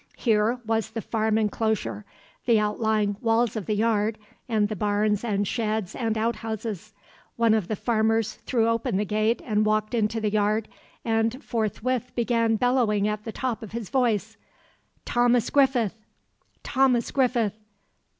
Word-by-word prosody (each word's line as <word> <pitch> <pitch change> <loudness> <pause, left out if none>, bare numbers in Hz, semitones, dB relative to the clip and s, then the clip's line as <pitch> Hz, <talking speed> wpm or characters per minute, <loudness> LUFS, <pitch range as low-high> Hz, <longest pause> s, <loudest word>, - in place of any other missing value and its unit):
Here 225 +1 +2
was 225 0 0
the 225 0 -5
farm 220 -1 0
enclosure; 215 -1 -1 0.4
the 230 -3 +5
outlying 210 -1 0
walls 230 0 +2
of 215 -4 -4
the 215 - +1
yard 220 0 +1 0.3
and 215 -3 +2
the 215 - -4
barns 210 +1 +1
and 205 -3 0
sheds 215 -3 -2
and 225 -2 -1
outhouses. 220 -2 -3 0.4
One 230 -1 +3
of 215 -5 +1
the 215 - -1
farmers 220 0 +1
threw 230 0 0
open 230 -2 0
the 210 - 0
gate 215 +3 0
and 215 -2 +1
walked 215 +1 0
into 225 -1 0
the 215 -1 -1
yard, 215 +1 +1 0.4
and 225 +3 0
forthwith 240 +3 -2
began 230 -1 +2
bellowing 225 -4 +2
at 210 0 -3
the 225 - -4
top 245 -1 -3
of 220 -2 -9
his 230 -4 -5
voice: 240 -6 0 0.7
"Thomas 240 -1 +2
Griffith! 265 -7 +3 0.7
Thomas 260 -3 +2
Griffith! 245 -6 +1
220 Hz, 150 wpm, -25 LUFS, 210-235 Hz, 0.7 s, the